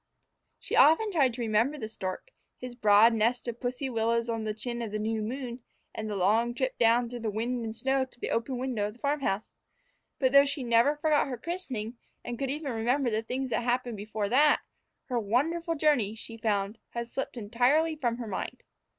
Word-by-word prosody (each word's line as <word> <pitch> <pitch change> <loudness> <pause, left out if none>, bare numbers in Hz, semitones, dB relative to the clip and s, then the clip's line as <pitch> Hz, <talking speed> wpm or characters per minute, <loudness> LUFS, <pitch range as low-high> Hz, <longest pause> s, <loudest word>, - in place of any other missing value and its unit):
She - - -3
often 410 +8 +5
tried 270 -9 +2
to 245 - -5
remember 230 +6 +1
the 220 -6 -5
stork, 205 - -6 0.3
his 250 -1 -7
broad 215 0 +5
nest 230 +3 +1
of 235 0 -4
pussy 250 +2 -2
willows 230 -1 0
on 225 -1 -3
the 215 - -1
chin 235 +1 -4
of 225 -3 -4
the 215 - -2
new 220 +1 -1
moon, 245 +2 -4 0.3
and 220 0 -4
the 210 - -3
long 225 +6 +2
trip 260 0 -2
down 235 +1 +4
through 245 +1 -6
the 225 -1 -2
wind 235 +3 -2
and 220 -1 -5
snow 265 +3 +1
to 255 - -20
the - - -3
open 235 +3 -1
window 245 -5 -1
of 210 - -7
the 240 - -21
farm 285 +3 0
house. 210 -6 -2 0.6
But 260 -2 +2
though 280 +1 +7
she 280 -1 -3
never 240 +5 +4
forgot 300 -1 +2
her 255 -2 -4
christening, 250 -8 -5 0.3
and 240 -1 -5
could 270 -1 -1
even 290 0 -3
remember 235 0 0
things 255 +3 -4
that - - +1
happened 245 -1 -1
before 210 0 -3
that, 290 +6 +4 0.4
her 245 -2 -1
wonderful 325 +11 0
journey, 285 -9 +2
she 225 +1 -8
found, 210 -1 -1
had 235 0 -4
slipped 260 +1 -5
entirely 250 +9 +2
from 240 -6 -1
her 240 - -5
mind. 190 - -5
240 Hz, 205 wpm, -29 LUFS, 225-265 Hz, 0.6 s, though